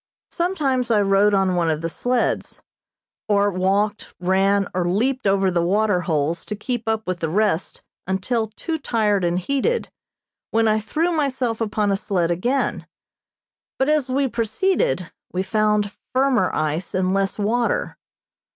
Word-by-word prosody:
Sometimes 285 -9 0
I 220 -2 +4
rode 200 +1 +3
on 190 -1 +2
one 170 -2 +1
of 155 -1 -1
the 165 - -1
sleds 245 +8 -1 0.7
or 205 0 +3
walked, 200 +3 0
ran 195 +2 +2
or 180 -1 0
leaped 245 +5 0
over 195 -1 +2
the 175 -1 +1
water 200 +1 +2
holes 160 0 -1
to 210 - -4
keep 235 +2 -4
up 220 0 0
with 180 -1 -3
the 165 - -2
rest 195 -1 0 0.2
until 220 +5 0
too 320 +9 -4
tired 210 -7 +1
and 175 0 +1
heated, 280 - 0 0.6
when 225 0 +2
I 215 0 +3
threw 315 +11 -1
myself 265 -7 -1
upon 210 -2 0
a - - +2
sled 185 -4 0
again; 245 +11 -1 0.9
but 265 +2 +1
as 300 -4 +2
we 270 +1 +1
proceeded 225 - 0 0.2
we 185 +1 -1
found 210 +1 +1 0.2
firmer 255 -7 +3
ice 155 +4 -2
and 185 0 +1
less 195 0 0
water. 230 +3 0
210 Hz, 150 wpm, -22 LUFS, 185-245 Hz, 0.9 s, I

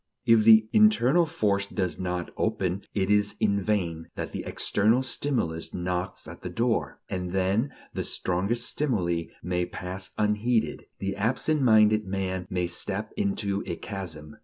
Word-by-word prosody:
If 115 -3 +5
the 110 -1 +7
internal 175 - +5
force 100 -6 0
does 95 -3 -2
not 90 -2 -3
open, 95 +1 -1
it 95 -1 +1
is 105 0 +2
in 100 -1 +2
vain 85 -5 -1
that - - -4
the - - -5
external 110 +6 +2
stimulus 120 - -1
knocks 90 +1 -3
at - - -10
the - - -5
door. 115 0 -1
And 90 -1 -4
then 95 +8 +1 0.2
the - - -2
strongest 100 +7 0
stimuli 90 - 0 0.2
may 90 0 -1
pass 95 +1 -6
unheeded. 110 +2 0
The 95 0 -3
absent 125 +8 +1
minded 110 -3 +4
man 95 -1 -3
may 90 -1 0
step 100 +4 -3
into 115 - -1
a 85 - -2
chasm. 80 -7 -6
100 Hz, 150 wpm, -27 LUFS, 90-115 Hz, 0.2 s, the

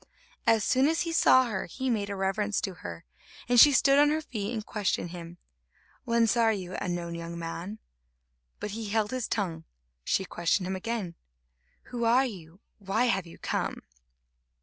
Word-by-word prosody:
As 225 -2 +4
soon 260 +5 +3
as 325 +1 +1
he 335 - -2
saw 260 -5 +5
her, 205 -6 -3
he 260 +9 -4
made 210 -5 0
a 200 - -3
reverence 195 +2 0
to 195 - -3
her, 85 - -9 0.4
and 245 0 +5
she 290 - +10
stood 275 +1 +5
on 290 0 +6
her 310 +1 +1
feet 215 -9 -4
and 220 -3 -4
questioned 195 -4 -2
him: 170 -1 -9 0.7
"Whence 230 -1 +3
are 230 -2 +4
you, 185 -3 -4
unknown 175 -2 -3
young 170 0 -6
man?" 170 +5 -5 0.8
But 210 - -4
he 220 0 -5
held 215 0 0
his 255 -3 -2
tongue. 170 -6 -2 0.4
She 190 - 0
questioned 175 +2 0
him 190 +1 -2
again: 200 -3 -3 0.8
"Who 240 -1 -2
are 245 +4 +4
you? 180 -5 -9 0.2
Why 205 +4 0
have 195 -7 0
you 165 - -12
come?" - - -3
205 Hz, 175 wpm, -28 LUFS, 180-235 Hz, 0.8 s, she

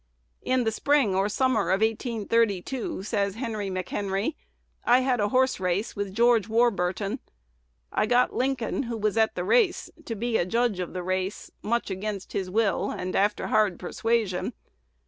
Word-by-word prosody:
"In 255 -1 +1
the 225 - +1
spring 275 -3 +2
or 195 +2 +1
summer 255 -5 +1
of 190 +2 +2
1832," 225 -1 0
says 200 -2 -1
Henry 220 -4 -3
McHenry, 195 - -2 0.5
"I 245 +2 +5
had 255 -2 +1
a 205 0 +1
horse 260 +1 +2
race 185 +3 -1
with 200 -2 -4
George 230 -2 +4
Warbur 220 -6 +2
ton. 205 +6 -3 0.7
I 215 - +1
got 245 +2 +3
Lincoln, 260 -1 -1
who 230 - -3
was 215 -1 0
at 220 -1 +2
the 180 - -2
race, 375 - +2
to 230 - -4
be 230 +1 0
a - - +1
judge 230 -2 +1
of 180 - -4
the 180 -1 -4
race, 185 +2 -3
much 235 -1 -1
against 195 0 -4
his 190 -2 -2
will 205 -1 +1
and 185 0 -4
after 205 +2 +1
hard 205 -5 +2
persuasion. 220 0 -1
215 Hz, 165 wpm, -26 LUFS, 195-235 Hz, 0.7 s, I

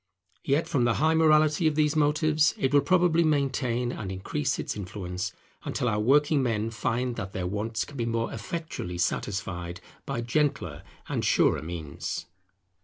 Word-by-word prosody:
Yet, 140 +4 +1
from 135 -8 +1
the 120 - +2
high 160 +2 +3
morality 155 0 +4
of 155 - +1
these 150 0 +2
motives, 155 +1 +3
it 135 +1 0
will 145 - +6
probably 175 -2 +3
maintain 130 -5 0
and 105 -6 -5
increase 130 +9 -2
its - - -3
influence 90 -2 -4 0.3
until 125 - -2
our 105 -2 +1
working 145 +6 +4
men 115 -3 0
find 120 +1 -1
that 95 -3 -5
their 90 - -3
wants 105 +4 -2
can 145 - -11
be 115 -1 -1
more 115 0 -1
effectually 115 - -5
satisfied 90 -1 -2 0.3
by 135 -4 -2
gentler 120 - -1 0.3
and - - -2
surer 75 - +3
means. 80 -3 -5
125 Hz, 160 wpm, -27 LUFS, 100-150 Hz, 0.3 s, will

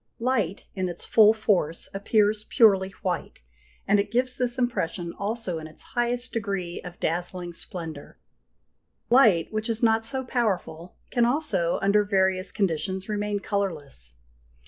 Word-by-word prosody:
Light, 230 -7 -1
in 185 -2 -2
its 175 - -6
full 215 -1 +6
force, 205 -7 +1
appears 210 +1 +1
purely 195 -5 +4
white, 180 - -3 0.4
and 205 - +4
it 200 +1 -1
gives 250 +3 +1
this 245 -1 -1
impression 185 -8 -2
also 200 -4 -3
in 155 - -8
its 155 - -5
highest 240 0 +1
degree 195 -6 -3
of 175 -1 -10
dazzling 175 +1 -1
splendour. 165 -4 -7 0.9
Light, 220 -9 +5
which 215 +2 -2
is 230 +1 -2
not 225 -1 +3
so 260 +3 +2
powerful, 185 -8 -2 0.2
can 240 - +2
also, 235 - +1
under 205 +1 +4
various 190 -2 +1
conditions, 190 0 -2
remain 205 -1 -2
colourless. 150 - -3
200 Hz, 140 wpm, -25 LUFS, 175-225 Hz, 0.9 s, full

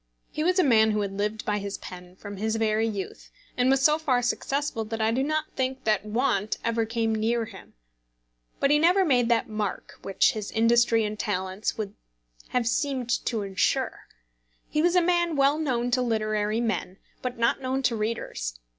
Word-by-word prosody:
He 305 - -2
was 365 +3 +2
a 370 - +5
man 220 -5 +5
who 210 -1 0
had 195 -1 -3
lived 210 +2 -2
by 210 0 0
his 200 0 -5
pen 180 0 -11
from 205 +1 -9
his 220 +2 -1
very 220 0 +1
youth; 205 -3 -6 0.3
and 250 +1 +2
was 270 0 +3
so 305 +2 +5
far 255 -6 +1
successful 270 0 -1
that 225 +1 -5
I 220 0 +2
do 250 +3 0
not 310 +2 -1
think 260 0 -2
that 210 -3 +1
want 215 -2 0
ever 230 -1 0
came 225 -1 0
near 225 +2 0
him. - - -13 0.8
But 275 - +3
he 295 - +5
never 360 +4 +4
made 245 -6 +3
that 235 -1 +2
mark 215 -3 -4
which 195 +6 +2
his 215 -5 -5
industry 230 0 +3
and 210 0 -5
talents 190 0 -2
would 205 -2 -4 0.5
have 245 -2 0
seemed 255 -1 -1 0.2
to 225 -4 -1
ensure. 190 -2 -1 0.6
He 305 - 0
was 350 +2 +2
a 360 - +5
man 345 -2 +2
well 280 +2 +3
known 245 -5 -1
to 255 +1 +2
literary 215 -2 0
men, 215 -5 -2 0.2
but 250 -1 -4
not 235 +3 +1
known 260 +1 -1
to 245 -2 +2
readers. 210 - -3
230 Hz, 190 wpm, -26 LUFS, 215-265 Hz, 0.8 s, a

